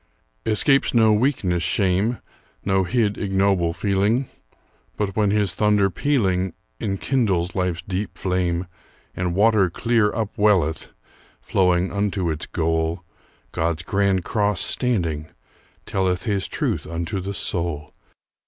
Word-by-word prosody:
Escapes 135 +5 +3
no 110 -2 +5
weakness 105 -7 +1
shame, 95 +5 +1 0.5
No 95 -1 +2
hid, 105 0 0
ignoble 95 -4 +1
feeling; 100 +8 +1 0.7
But 100 -2 -2
when 105 -2 +2
his 100 -2 +1
thunder 105 -2 +2
pealing 95 - 0 0.3
Enkindles 100 -3 0
life's 90 -3 -1
deep 95 +1 -4
flame, 90 -1 -1 0.5
And 90 -1 -2
water 105 -2 +4
clear 115 +3 +1
upwelleth, 105 -7 +1 0.5
Flowing 90 -1 +1
unto 100 -4 -1
its 75 - -5
goal, 80 +1 -1 0.5
God's 80 0 -1
grand 95 -2 +1
cross 105 -3 0
standing, 85 - 0 0.6
telleth 95 -2 0
His 100 -4 -1
truth - - -2
unto 85 +3 -3
the 100 +2 -5
soul. 85 -6 -2
95 Hz, 115 wpm, -22 LUFS, 90-105 Hz, 0.7 s, no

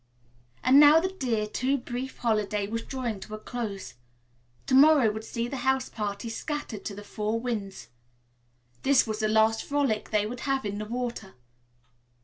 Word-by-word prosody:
And 260 +3 +7
now 295 +2 +8
the 375 +3 -1
dear, 240 - -1
too 255 +6 0
brief 250 +1 -6
holiday 210 -3 0
was 230 +3 -3
drawing 240 -5 -4
to 215 +3 -7
a - - -7
close. 215 - -5 0.7
To - - -2
morrow 275 -4 +6
would 220 +1 -6
see 235 +1 -3
the 270 - -5
house 265 +1 0
party 205 0 -4
scattered 230 -2 -5
to 200 - -4
the 205 - -9
four 215 +2 -2
winds. 215 -5 -5 0.9
This 275 -1 +4
was 220 -1 -3
the 215 - +1
last 220 +1 +3
frolic 275 -7 0
they 210 -1 +1
would 240 +3 -5
have 270 -2 -1
in 205 0 -3
the 215 - -4
water. 235 -3 -5
230 Hz, 170 wpm, -27 LUFS, 210-260 Hz, 0.9 s, now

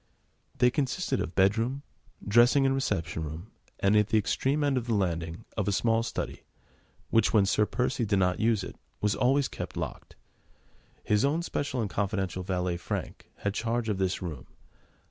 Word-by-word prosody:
They 125 0 +4
consisted 135 -1 -1
of 85 - -5
bedroom, 115 +8 +2 0.4
dressing 120 +6 +5
and 135 - +3
reception 90 -11 -1
room, 80 +7 -7 0.3
and, 100 +2 +3
at 105 -1 +4
the 110 0 +2
extreme 135 +7 +1
end 140 -2 +2
of 125 -2 -2
the 115 - +1
landing, 85 0 -2
of 105 -3 -1
a - - +2
small 115 +3 +2
study, 115 - -4 0.7
which, 115 - +3
when 105 -3 +5
Sir 105 +1 +2
Percy 125 0 -1
did 100 -2 +1
not 90 -1 +2
use 110 -3 +2
it, - - -8 0.2
was 105 0 +1
always 135 +2 +2
kept - - -7
locked. - - -6 0.9
His 105 -1 +2
own 150 +5 +1
special 140 -6 -2
and 110 - -1
confidential 95 -3 -1
valet, 90 -1 -1
Frank, 85 -2 -5
had 100 - 0
charge 115 +1 -1
of 100 -3 -1
this 95 0 -1
room. 75 -8 -6
105 Hz, 175 wpm, -28 LUFS, 95-125 Hz, 0.9 s, dressing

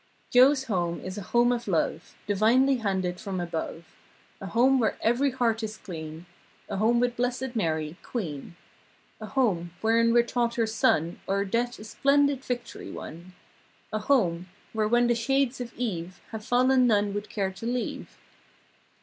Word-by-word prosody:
Joe's 265 +2 +6
home 175 -8 -1
is 185 +2 -6
a 190 - -10
home 240 +1 +4
of 240 -2 -2
love 170 -5 -1
Divinely 235 +7 +3
handed 190 -5 -1
from 190 -2 -4
above. 170 -1 -4 0.6
A 195 - -5
home 255 +6 +3
where 225 - +1
every 245 +5 +2
heart 235 -3 0
is 215 0 -5
clean. 160 -2 -8 0.4
A 200 - -4
home 230 +4 +3
with 245 0 +1
Blessed 250 +1 -2
Mary, 160 -5 -1
queen. 170 - -5 0.6
A 215 - -7
home, 190 -8 0
wherein 230 +1 +3
we're 240 0 +5
taught 235 0 -1
her 230 - +2
Son 170 -6 +1
O'er 200 +1 +1
Death 240 +5 -1
a - - -10
splendid 280 +4 +2
victory 245 -2 -5
won. 170 +3 -9 0.6
A 215 - 0
home, 185 -8 +1 0.2
where, 215 -1 +1
when 240 +2 +3
the 240 - +3
shades 265 +2 0
of 240 -1 -5
eve 185 -7 -4
Have 220 -1 -6
fallen 255 +2 +3
none 205 -3 +2
would 205 0 -4
care 195 -3 -1
to 190 +4 -9
leave. 245 0 -4
225 Hz, 165 wpm, -27 LUFS, 185-245 Hz, 0.6 s, Joe's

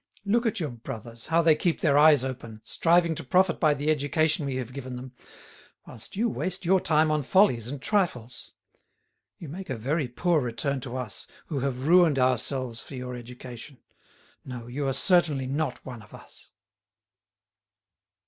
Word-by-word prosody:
Look 230 +4 +2
at 225 -1 -1
your 155 -6 -3
brothers, 115 0 -8
how 165 +1 +3
they 160 -1 +6
keep 165 +2 -1
their 145 -4 +3
eyes 145 -2 +6
open, 120 -4 -6
striving 170 0 +2
to - - -6
profit 180 +5 +2
by 155 -2 +3
the 145 +2 0
education 155 +1 +1
we 135 - -3
have 125 -1 -5
given 130 -2 -6
them, 125 +1 -9 0.7
whilst 115 - -11
you 225 +4 +1
waste 190 -4 -3
your 185 +1 +4
time 155 0 +2
on 155 -1 +1
follies 130 - +3
and 140 +2 -5
trifles. 130 - -1 0.9
You 165 - -9
make 185 +6 -8
a 130 - -3
very 140 +5 -1
poor 160 +6 +1
return 130 +3 -2
to 130 0 -6
us, 125 -5 -6 0.2
who 145 -5 -2
have 130 0 -3
ruined 170 -4 +5
ourselves 130 -1 0
for 140 - -10
your 125 0 -6
education. 125 +2 -10 0.7
No, 125 -3 -8
you 135 +4 -3
are 135 - 0
certainly 155 -5 +2
not 145 +4 -3
one 125 -3 -8
of 105 - -14
us." - - -15
140 Hz, 170 wpm, -26 LUFS, 125-165 Hz, 0.9 s, they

